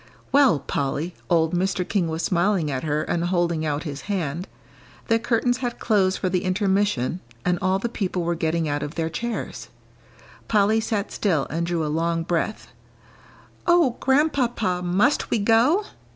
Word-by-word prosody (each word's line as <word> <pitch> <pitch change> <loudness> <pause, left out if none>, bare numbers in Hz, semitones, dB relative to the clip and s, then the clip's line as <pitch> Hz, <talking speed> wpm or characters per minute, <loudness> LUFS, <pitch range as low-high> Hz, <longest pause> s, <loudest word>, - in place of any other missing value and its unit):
"Well, 275 - +5
Polly." 145 +5 -2 0.2
Old 165 -1 +2
Mr. 185 0 0
King 195 -5 0
was 160 +1 -3
smiling 175 -2 +1
at 130 -1 -2
her 150 -1 0
and 170 - -1
holding 175 -3 0
out 150 0 -1
his 145 -4 -6
hand. 175 -3 -2 0.6
The 225 0 +4
curtains 245 +1 +1
had 245 -2 -3
closed 195 -4 +2
for 185 - -1
the 180 -1 0
intermission, 190 - +1 0.3
and 180 -1 +1
all 185 +1 +2
the 200 - -2
people 190 -6 -2
were 170 +1 0
getting 165 -1 -1
out 145 0 -1
of 145 - -5
their 165 -1 -2
chairs. 235 +7 -4 0.8
Polly 215 +1 +3
sat 215 -2 -2
still 165 -9 0
and 170 +2 -1
drew 170 -2 -1
a - - -2
long 165 +2 0
breath. 175 +5 -2 1.0
"Oh, 340 -8 +4
Grandpapa, 255 - +1
must 195 +11 +2
we - - +2
go?" 235 - +3
180 Hz, 165 wpm, -24 LUFS, 165-220 Hz, 1.0 s, Well